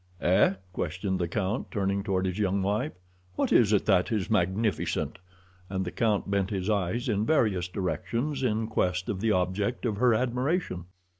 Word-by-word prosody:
"Eh?" 95 +2 +4 0.2
questioned 90 +3 -2
the 85 - 0
count, 100 +5 -2
turning 100 -2 0
toward 95 -2 0
his 95 +2 -2
young 100 -1 +1
wife. 105 +10 0 0.4
"What - - 0
is 110 -3 +5
it 105 - +3
that 95 -1 +3
is 105 -2 -1
magnificent?" 100 +1 0 0.5
and 95 0 -2
the 90 - -4
count 110 -3 +1
bent 100 -1 0
his 95 0 -1
eyes 100 +4 0
in 105 -3 +1
various 105 - +2
directions 110 - -2
in 110 -3 +1
quest 90 -4 -1
of 95 - -2
the 115 0 +2
object 100 +6 0
of 110 -4 -1
her 120 0 +4
admiration. 125 - -1
100 Hz, 170 wpm, -28 LUFS, 95-110 Hz, 0.5 s, is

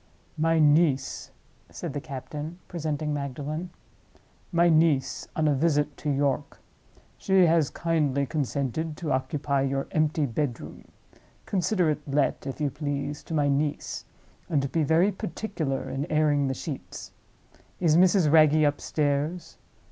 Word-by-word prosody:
"My 165 +1 +3
niece," 150 -3 +2 0.4
said - - -6
the 145 - -3
captain, 150 +3 -7
presenting 155 -2 -3
Magdalen; 145 +4 -4 0.8
"my 170 -1 +4
niece 155 -5 +2
on 155 -1 +1
a 150 - +3
visit 150 0 +1
to 150 - -3
York. 140 0 -1 0.6
She 190 -2 +4
has 165 -3 +3
kindly 150 -5 0
consented 145 +2 -2
to 160 -4 -3
occupy 140 +1 0
your 135 0 -1
empty 155 -1 +1
bedroom. 130 0 -4 0.6
Consider 180 -3 +1
it 150 - -3
let, 140 0 0
if 135 - -5
you 145 -2 0
please, 145 0 -3
to 165 - -4
my 145 -2 +2
niece—and 145 0 -3
be 165 - +1
very 160 +7 +3
particular 165 -7 -4
in 140 +3 -4
airing 150 -2 +2
the 130 - -1
sheets? 140 +1 -7 0.7
Is 165 -4 +3
Mrs. 180 -3 +4
Wragge 155 -1 +6
upstairs? 145 +3 -1
150 Hz, 130 wpm, -26 LUFS, 140-160 Hz, 0.8 s, Wragge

